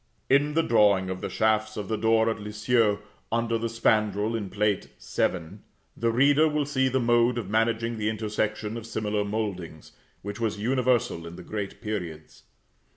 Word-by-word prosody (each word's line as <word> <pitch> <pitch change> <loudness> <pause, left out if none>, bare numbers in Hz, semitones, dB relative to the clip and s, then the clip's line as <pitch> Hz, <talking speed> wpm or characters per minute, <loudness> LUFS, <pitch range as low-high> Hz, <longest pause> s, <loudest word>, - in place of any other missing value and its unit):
In 145 +2 +3
the 165 - +3
drawing 100 -6 +3
of 95 - -5
the - - -3
shafts 110 0 +1
of 105 -2 -4
the 110 - -1
door 110 +1 +3
at 110 - -5
Lisieux, 105 +1 +1 0.3
under 115 0 0
the 115 0 -2
spandril, 110 -1 +1
in 105 -4 -3
Plate 105 0 0
VII., 85 -3 -2 0.4
the 115 - 0
reader 145 +6 +4
will 150 -1 0
see 130 -2 +1
the 130 +1 +1
mode 120 0 +3
of 105 -4 -4
managing 115 +1 +1
the 105 0 0
intersection 110 0 -2
of 115 -1 -8
similar 105 -2 -1
mouldings, 100 -7 -4 0.3
which 100 +3 -6
was 110 -3 -1
universal 120 -6 0
in 85 - -9
the 90 - -10
great 100 +1 -5
periods. 90 -8 -6
110 Hz, 170 wpm, -26 LUFS, 105-115 Hz, 0.4 s, reader